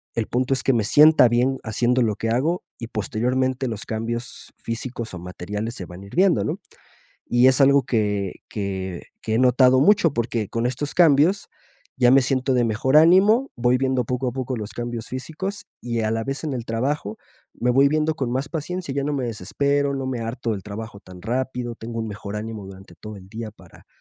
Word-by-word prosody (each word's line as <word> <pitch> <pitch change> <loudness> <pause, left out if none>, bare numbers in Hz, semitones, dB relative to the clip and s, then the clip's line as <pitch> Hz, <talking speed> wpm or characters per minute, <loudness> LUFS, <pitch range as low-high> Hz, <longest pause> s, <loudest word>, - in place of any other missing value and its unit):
el 115 -2 -1
punto 130 +2 0
es 135 - -2
que 135 - +3
me 115 -3 +1
sienta 150 +3 +6
bien 125 +3 +1
haciendo 120 +3 +1
lo 110 -3 +1
que 115 - -3
hago 150 +10 0 0.2
y 115 - -6
posteriormente 125 +5 -1
los 110 -3 -5
cambios 115 +2 -5
físicos 115 -1 -5
o 90 - -6
materiales 105 +6 -5
se 95 - -6
van 90 +2 -11
a - - -11
ir - - -12
viendo, 185 0 +3
¿no? 165 +6 -3 0.7
Y 120 +1 +4
es 130 +2 +4
algo 140 0 +6
que 105 -5 -1
que 95 -3 -4 0.2
que 110 - -2
he - - +2
notado 130 +1 +5
mucho, 170 -1 +4
porque 115 -3 -2
con 115 +2 -1
estos 130 +3 -3
cambios 165 +3 +4 0.5
ya 125 -1 +4
me 135 +2 +7
siento 130 0 0
de 125 -1 +3
mejor 115 +5 +1
ánimo, 195 - +5
voy 120 +1 +2
viendo 130 -1 0
poco 125 +2 -2
a - - -3
poco 130 0 -3
los 105 -2 -6
cambios 120 -1 -5
físicos 160 +10 -5 0.2
y 115 -1 -2
a 110 -1 0
la 115 0 -1
vez 135 +1 -4
en 150 - -2
el 120 -3 -4
trabajo 115 -1 -2 0.4
me 125 - 0
voy 135 +3 +5
viendo 155 +1 +1
con 130 -5 -2
más 135 +2 -1
paciencia, 170 0 -4
ya 140 0 -1
no 150 - -1
me 135 -3 -1
desespero, 140 +7 -1
no 135 -1 -3
me 130 -2 -2
harto 115 +1 -3
del 100 -3 -5
trabajo 105 +1 -7
tan 90 -2 -13
rápido, 125 0 -3
tengo 115 0 -5
un 110 - -4
mejor 105 0 -7
ánimo 110 -2 -6
durante 95 0 -13
todo 105 0 -9
el 95 -1 -13
día 110 +1 -6
para - - -18
125 Hz, 210 wpm, -23 LUFS, 110-135 Hz, 0.7 s, me